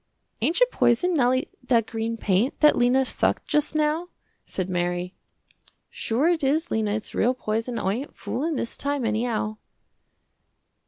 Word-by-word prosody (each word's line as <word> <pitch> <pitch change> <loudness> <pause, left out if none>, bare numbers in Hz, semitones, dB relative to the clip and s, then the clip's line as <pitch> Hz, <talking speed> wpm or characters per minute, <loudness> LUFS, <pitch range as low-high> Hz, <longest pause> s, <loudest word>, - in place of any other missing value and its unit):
"Ain't 335 - +1
it - - +5
poison, 355 +10 +2
Nellie, 255 -3 +2
that 240 -3 +2
green 225 +1 -3
paint, 210 +4 +1
that 300 -1 +7
Lena 250 +2 +3
sucked - - 0
just 300 0 0
now," 310 +3 0 0.4
said 185 -2 -3
Mary. 175 0 -2 0.8
"Sure 245 +8 0
it 340 -3 +1
is 305 +5 +1
Lena, 215 -2 0
its 215 - -6
real 250 +3 +2
poison, 225 +1 -2
I 190 - 0
ain't 265 +7 -6
foolin' 315 +4 -3
this 235 - -3
time 285 -3 -1
anyhow." 220 -1 -1
245 Hz, 150 wpm, -25 LUFS, 220-295 Hz, 0.8 s, that